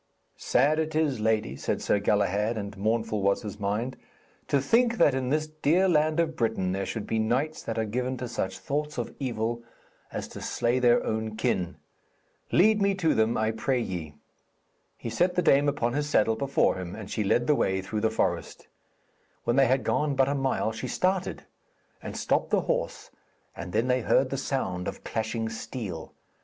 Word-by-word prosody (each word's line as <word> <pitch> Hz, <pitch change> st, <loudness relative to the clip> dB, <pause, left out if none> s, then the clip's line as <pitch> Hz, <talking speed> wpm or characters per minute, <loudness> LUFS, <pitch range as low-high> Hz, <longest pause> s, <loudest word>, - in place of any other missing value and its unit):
'Sad 145 Hz, +5 st, +2 dB
it 160 Hz, 0 st, -2 dB
is, 150 Hz, -6 st, +1 dB
lady,' 110 Hz, -8 st, +1 dB
said -, -, -2 dB
Sir 105 Hz, -, +1 dB
Galahad, 105 Hz, +2 st, +1 dB
and 100 Hz, -1 st, -5 dB
mournful 110 Hz, +1 st, 0 dB
was 100 Hz, 0 st, +1 dB
his 105 Hz, -1 st, -7 dB
mind, 105 Hz, +6 st, -2 dB, 0.5 s
'to 140 Hz, -, +3 dB
think 230 Hz, -, +3 dB
that 145 Hz, -, +5 dB
in 130 Hz, -1 st, -1 dB
this 155 Hz, +2 st, +1 dB
dear 155 Hz, +4 st, +2 dB
land 155 Hz, -1 st, +2 dB
of 160 Hz, -2 st, +1 dB
Britain 110 Hz, -8 st, 0 dB
there 95 Hz, 0 st, -2 dB
should 110 Hz, -, -4 dB
be 110 Hz, -, -1 dB
knights 130 Hz, +8 st, 0 dB
that 115 Hz, -, -4 dB
are 110 Hz, -, +1 dB
given 125 Hz, +4 st, -2 dB
to 125 Hz, +1 st, -4 dB
such 95 Hz, -4 st, -3 dB
thoughts 150 Hz, +1 st, -3 dB
of -, -, -3 dB
evil 120 Hz, -3 st, -2 dB, 0.5 s
as -, -, -4 dB
to -, -, -9 dB
slay 120 Hz, +2 st, 0 dB
their 120 Hz, -1 st, +4 dB
own 110 Hz, 0 st, -2 dB
kin. 90 Hz, -5 st, 0 dB, 0.8 s
Lead 210 Hz, +4 st, +4 dB
me 200 Hz, 0 st, +3 dB
to 165 Hz, -5 st, +2 dB
them, 110 Hz, +1 st, +2 dB
I 110 Hz, 0 st, +1 dB
pray 125 Hz, +3 st, 0 dB
ye.' 85 Hz, -9 st, -4 dB, 0.8 s
He 115 Hz, -, -5 dB
set 180 Hz, +10 st, +1 dB
the 180 Hz, -, +2 dB
dame 145 Hz, -2 st, +5 dB
upon 120 Hz, -3 st, -1 dB
his 145 Hz, 0 st, -1 dB
saddle 110 Hz, -5 st, +3 dB
before 135 Hz, -4 st, +1 dB
him, 90 Hz, 0 st, -6 dB
and 105 Hz, -2 st, -8 dB
she 110 Hz, -, 0 dB
led 120 Hz, +4 st, +2 dB
the 150 Hz, -, +4 dB
way 95 Hz, -9 st, +1 dB
through 105 Hz, +2 st, -3 dB
the 110 Hz, -, +3 dB
forest. 110 Hz, -, -2 dB, 0.8 s
When 120 Hz, -, +1 dB
they 135 Hz, -1 st, +5 dB
had 130 Hz, 0 st, +2 dB
gone 145 Hz, +5 st, +1 dB
but 135 Hz, 0 st, +3 dB
a 140 Hz, -, +1 dB
mile 135 Hz, -5 st, 0 dB
she 110 Hz, -, -5 dB
started, 185 Hz, 0 st, -1 dB, 0.6 s
and -, -, -6 dB
stopped -, -, 0 dB
the -, -, +2 dB
horse, -, -, -2 dB, 0.4 s
and 90 Hz, -, -7 dB
then 115 Hz, +6 st, +1 dB
they 125 Hz, 0 st, +2 dB
heard 130 Hz, +3 st, +2 dB
the 135 Hz, -, -1 dB
sound 95 Hz, -10 st, -2 dB
of -, -, -6 dB
clashing 110 Hz, 0 st, -2 dB
steel. 115 Hz, -2 st, -6 dB
120 Hz, 195 wpm, -27 LUFS, 110-145 Hz, 0.8 s, that